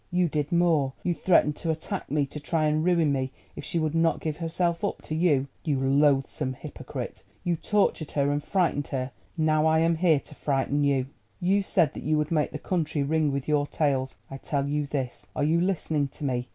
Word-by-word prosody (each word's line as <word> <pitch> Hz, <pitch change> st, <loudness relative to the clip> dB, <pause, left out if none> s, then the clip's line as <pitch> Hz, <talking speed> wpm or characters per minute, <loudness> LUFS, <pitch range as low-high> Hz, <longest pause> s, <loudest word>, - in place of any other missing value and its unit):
You 180 Hz, 0 st, +2 dB
did 150 Hz, -2 st, -2 dB
more: 165 Hz, -6 st, +3 dB
you 175 Hz, -, +1 dB
threatened 165 Hz, -4 st, +3 dB
to 165 Hz, -, -3 dB
attack 160 Hz, +5 st, -3 dB
me, 145 Hz, +1 st, +1 dB
to 145 Hz, +2 st, -7 dB
try 155 Hz, +1 st, 0 dB
and 155 Hz, +1 st, +1 dB
ruin 170 Hz, -4 st, +3 dB
me 130 Hz, -1 st, -1 dB, 0.2 s
if -, -, -7 dB
she -, -, -3 dB
would 155 Hz, -2 st, 0 dB
not 165 Hz, 0 st, +2 dB
give 155 Hz, -2 st, -3 dB
herself 170 Hz, 0 st, -1 dB
up -, -, -2 dB
to -, -, -5 dB
you. 155 Hz, -5 st, +2 dB, 0.2 s
You 145 Hz, -4 st, 0 dB
loathsome 135 Hz, 0 st, +2 dB
hypocrite, -, -, -7 dB, 0.2 s
you 175 Hz, -1 st, +1 dB
tortured 180 Hz, -4 st, +1 dB
her 140 Hz, -1 st, +2 dB
and 145 Hz, 0 st, -1 dB
frightened 170 Hz, -7 st, 0 dB
her; 130 Hz, -1 st, -3 dB, 0.3 s
now 155 Hz, 0 st, +3 dB
I 160 Hz, 0 st, +4 dB
am 165 Hz, +1 st, +2 dB
here 165 Hz, -4 st, +4 dB
to 150 Hz, -, -13 dB
frighten 140 Hz, 0 st, 0 dB
you. 140 Hz, -2 st, +2 dB, 0.3 s
You 195 Hz, +2 st, +2 dB
said 170 Hz, -6 st, +2 dB
that -, -, -7 dB
you 155 Hz, 0 st, +1 dB
would 150 Hz, +1 st, -1 dB
make 155 Hz, -3 st, +2 dB
the -, -, -4 dB
country 160 Hz, -5 st, -1 dB
ring 155 Hz, 0 st, +1 dB
with 140 Hz, -1 st, -3 dB
your 145 Hz, -1 st, +2 dB
tales. 135 Hz, -4 st, 0 dB
I 135 Hz, -, -5 dB
tell 140 Hz, 0 st, -2 dB
you 145 Hz, 0 st, -1 dB
this—are 135 Hz, 0 st, -4 dB
you 165 Hz, +3 st, +3 dB
listening 160 Hz, -6 st, 0 dB
to 145 Hz, -, -7 dB
me? 125 Hz, -2 st, -1 dB
150 Hz, 210 wpm, -27 LUFS, 140-165 Hz, 0.3 s, I